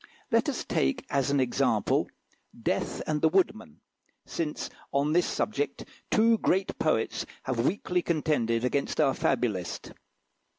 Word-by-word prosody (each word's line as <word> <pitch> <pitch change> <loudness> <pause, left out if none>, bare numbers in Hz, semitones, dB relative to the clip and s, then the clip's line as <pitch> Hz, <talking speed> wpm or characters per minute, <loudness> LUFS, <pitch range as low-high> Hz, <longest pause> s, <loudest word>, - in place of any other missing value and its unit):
Let - - +3
us - - -2
take 65 - 0
as 140 -1 +1
an 140 0 +2
example 130 -2 +1 0.5
"Death - - -1
and 150 -1 -1
the 160 - +5
Woodman," 155 - 0 0.4
since 155 -3 -3 0.2
on 140 +2 +1
this 175 +1 +3
subject 430 - -2 0.2
two 225 0 +4
great 190 +1 0
poets - - +1 0.2
have 125 -1 0
weakly 180 -1 0
contended 145 -9 +1
against 140 +2 -1
our 135 - +4
fabulist. 95 -7 -1
145 Hz, 130 wpm, -28 LUFS, 125-175 Hz, 0.5 s, the